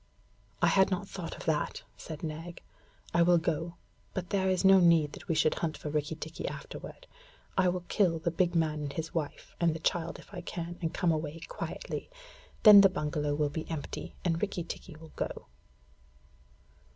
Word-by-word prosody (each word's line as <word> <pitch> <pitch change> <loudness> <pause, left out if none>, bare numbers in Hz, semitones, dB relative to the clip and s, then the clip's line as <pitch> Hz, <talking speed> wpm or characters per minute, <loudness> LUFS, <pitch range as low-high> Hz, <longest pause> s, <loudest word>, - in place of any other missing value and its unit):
I - - +7
had 190 -1 +5
not 195 +1 -2
thought 180 -4 -6
of - - -9
that,' 155 -2 -1
said 160 -1 -8
Nag. 165 +2 -6 0.5
'I 170 - +4
will 175 +1 +6
go, 165 +1 -1 0.4
but 180 -2 -4
there 190 -1 +2
is 185 0 +1
no 190 0 +8
need 165 -4 +4
that - - -11
we 165 - +1
should 155 0 +3
hunt 160 -2 -2
for 150 - -5
Rikki 150 +1 -1
tikki 155 +1 -6
afterward. - - -8 0.5
I 185 -1 +4
will 180 0 -1
kill 180 -6 +2
the 160 +1 -1
big 175 +1 +1
man 155 -2 +1
and 145 -1 -4
his 160 -1 -4
wife, 155 -4 -4
and 170 -2 +2
the - - -5
child 170 +1 -1
if - - -16
I 180 - -5
can, 175 0 -6
and 165 -2 -1
come 175 -2 +1
away 155 0 -3
quietly. - - -5 0.5
Then 210 -2 +11
the 195 - +7
bungalow 150 -3 -1
will 150 0 +1
be 160 +2 -5
empty, 160 -3 -5
and 165 -2 +1
Rikki 195 -4 -1
tikki 170 0 -8
will 160 0 -13
go.' - - -4
165 Hz, 190 wpm, -30 LUFS, 155-180 Hz, 0.5 s, Then